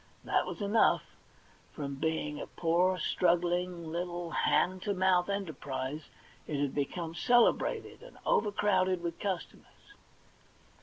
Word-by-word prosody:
That - - +1
was - - -6
enough. 205 +2 +3 0.7
From 140 -2 -4
being 150 0 -2
a - - -6
poor, 180 +2 +1
strugghng, 175 0 +1
little 175 +1 -4
hand 185 +4 +2
to 205 0 -1
mouth 185 -1 +3
enterprise, 150 -7 -4 0.4
it 150 -2 -2
had 140 -2 0
become 160 +3 -3
celebrated, 240 +6 +2
and - - -14
overcrowded 190 -4 +2
with 170 -1 -4
customers. 200 - -6
175 Hz, 115 wpm, -31 LUFS, 160-185 Hz, 0.7 s, enough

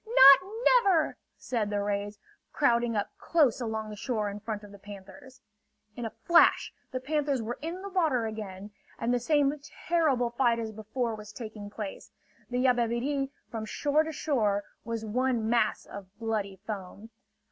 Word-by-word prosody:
"Not 365 - +8
never!" 395 -10 +4 0.2
said 225 -5 -2
the 205 0 -1
rays, 205 0 -2 0.3
crowding 240 -5 +2
up 205 - -1
close 285 -8 +2
along 220 -2 -3
the - - -6
shore 215 -2 -2
in 205 - -7
front 215 -1 -5
of 205 - -12
the 200 - -13
panthers. 205 +7 -12 0.5
In 240 - -5
a - - -2
flash, 340 -1 +5 0.2
the 255 - -3
panthers 285 0 0
were 230 +2 -4
in 340 +5 -5
the 400 - -5
water 315 -11 +1
again, 210 -2 -6 0.3
and 235 +2 0
the 245 - +2
same 285 +2 +2 0.3
terrible 285 -8 +2
fight 240 -1 +2
as 225 -1 -4
before 220 +3 -3
was 210 -1 -9
taking 215 -4 -8
place. 205 -1 -7 0.4
The 250 +1 0
Yabebirì 250 +3 +1 0.2
from 225 -2 -4
shore 290 +7 +1
to 320 0 -3
shore 220 -10 0 0.2
was 230 -1 -4
one 240 0 0
mass 230 -2 +1
of 195 -2 -10
bloody 215 -4 -2
foam. 205 +1 -7
235 Hz, 165 wpm, -29 LUFS, 210-275 Hz, 0.5 s, Not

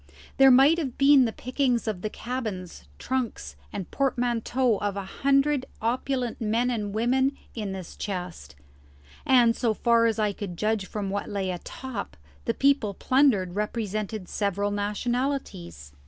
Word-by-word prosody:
There 270 -1 +8
might 275 +6 +6
have 270 -7 -4
been 275 -1 +6
the 225 - -1
pickings 255 -1 -1
of 205 -5 -2
the 215 - -2
cabins, 215 -8 -5
trunks, 240 - -3 0.2
and 190 - -6
portmanteaux 245 -2 +1
of 200 0 -2
a 200 - -4
hundred 275 +5 +1
opulent 245 +1 -2
men 230 +3 +1
and 210 -4 -2
women 255 +6 +1 0.2
in 210 -4 -4
this 190 -3 -7
chest, 180 - -6 0.7
and, 240 -3 +5
so 225 -3 0
far 230 0 +3
as 225 - 0
I 210 -2 +1
could 190 -4 -6
judge 215 0 0
from 200 -2 -4
what 200 0 -3
lay 195 -2 -2
atop, 200 - -6 0.3
the - - 0
people 275 -8 +2
plundered 255 -10 +2
represented 210 -1 -3
several 200 0 -1
nationalities. 205 - -3
225 Hz, 145 wpm, -26 LUFS, 200-255 Hz, 0.7 s, There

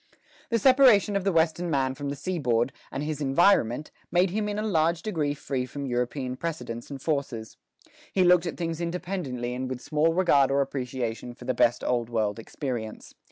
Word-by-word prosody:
The 230 - +2
separation 235 -4 +5
of 200 - 0
the 195 - +3
Western 165 +1 +1
man 135 -3 +1
from 140 +1 -5
the 140 - -3
seaboard, 135 -7 0 0.2
and 140 - -3
his 150 0 -3
environment, 145 - +3 0.2
made 180 +1 +3
him 210 +1 -1
in 205 - -3
a 210 - -1
large 165 -4 +1
degree 155 -9 -1
free 130 -3 -3
from 140 +2 -6
European 125 +1 -2
precedents 140 -8 -5
and 140 -1 -6
forces. 135 -7 -3 0.6
He 190 - +3
looked 180 -1 +5
at 165 - -4
things 165 -1 -3
independently 170 -9 -3
and 130 +1 -3
with 130 -1 -4
small 155 +4 +1
regard 145 -7 +4
or 140 +1 +2
appreciation 125 -3 -4
for - - -12
the 130 - 0
best 120 -1 +2
Old 120 -2 0
World 110 -2 -1
experience. 115 -2 -5
145 Hz, 185 wpm, -27 LUFS, 125-175 Hz, 0.6 s, separation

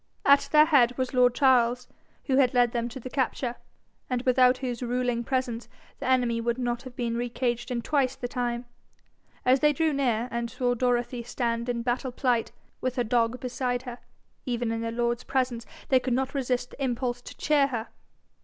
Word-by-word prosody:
At 280 0 +5
their 305 0 +7
head 250 -6 +4
was 255 0 -2
lord 250 -1 +4
Charles, 250 -2 +3 0.4
who 265 -2 +1
had 260 -2 +3
led 245 -1 +4
them 235 0 -2
to 260 - -8
the 255 - -8
capture, 255 -2 -2 0.5
and 250 -1 -1
without 255 0 +4
whose 250 -3 -4
ruling 245 -1 -1
presence 245 -2 -2 0.3
the - - -4
enemy 245 -3 +2
would 235 +1 -1
not 240 -1 -2
have 255 -1 -11
been 235 -2 -2
re 240 +1 -2
caged 240 -1 -2
in 240 -2 -2
twice 270 -2 +1
the 245 - -4
time. 245 -1 -2 0.8
As 255 +2 +5
they 295 +2 +4
drew 315 +1 +1
near, 245 -4 0
and 235 0 -2
saw 245 +1 0
Dorothy 245 0 0
stand 235 0 -2
in 235 -1 -1
battle 250 +2 -1
plight, 245 -2 0 0.3
with 255 -1 -1
her 245 - +1
dog 235 +1 +1
beside 250 0 -2
her, 245 -1 -7 0.4
even 240 -3 -2
in 225 0 -2
their 230 0 -2
lord's 240 +1 -1
presence 250 -3 -1 0.2
they 260 - +5
could 250 -1 -1
not 265 +1 -1
resist 250 -3 -1
the 275 - -6
impulse 245 -1 -1
to - - -11
cheer 290 -2 +3
her. 235 -4 -4
245 Hz, 195 wpm, -27 LUFS, 240-260 Hz, 0.8 s, their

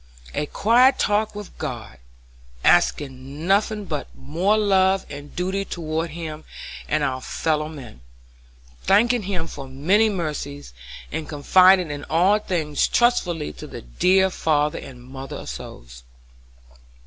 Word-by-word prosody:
A 150 - -2
quiet 245 - +4
talk 210 0 +1
with 205 -2 -8
God, 65 - -6 0.6
asking 135 +2 +1
nothing 205 +2 +1
but 150 -5 -4
more 175 +10 0
love 190 -2 +3
and 145 0 -9
duty 190 +2 -1
toward 165 -3 -3
Him 155 -1 -7 0.5
and 155 0 +1
our 130 -2 -1
fellow 155 +1 -1
men; 130 - -11 0.8
thanking 235 +4 +3
Him 185 -4 -3
for 140 -4 -8
many 180 +12 +2
mercies, 150 - -4 0.4
and 155 0 -4
confiding 170 0 +4
all 185 +6 +3
things 160 -8 0
trustfully 180 -10 +1
to - - -10
the - - -9
"dear 185 - +2
father 150 -3 0
and 125 -3 -11
mother 135 +1 -8
of - - -7
souls." - - -9
160 Hz, 125 wpm, -23 LUFS, 145-195 Hz, 0.8 s, quiet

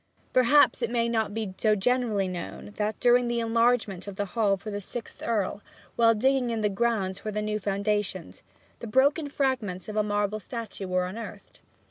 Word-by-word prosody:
Perhaps 255 +2 +5
it 235 - 0
may 235 -1 +1
not 220 -3 0
be 210 -3 -4
so 215 -1 +3
generally 215 -2 +1
known 185 +3 -6
that, 210 0 -1
during 245 0 +4
the 235 0 0
enlargement 230 -4 +1
of 200 - -6
the 205 - -2
Hall 210 -4 +2
for 215 +3 -7
the 205 0 -4
sixth 230 +4 -8
Earl, 210 -3 -1 0.3
while 230 -1 +5
digging 260 +2 +2
in 225 -1 -1
the 210 - +2
grounds 200 -3 0
for 215 - -5
the 210 0 -2
new 210 0 -1
foundations, 200 -2 -2 0.4
the 235 - -6
broken 285 +6 +2
fragments 245 -11 -1
of 215 - -6
a 215 - +3
marble 205 0 -1
statue 215 -2 -6
were 180 0 +1
unearthed. 220 +5 -8
215 Hz, 185 wpm, -27 LUFS, 200-235 Hz, 0.4 s, Perhaps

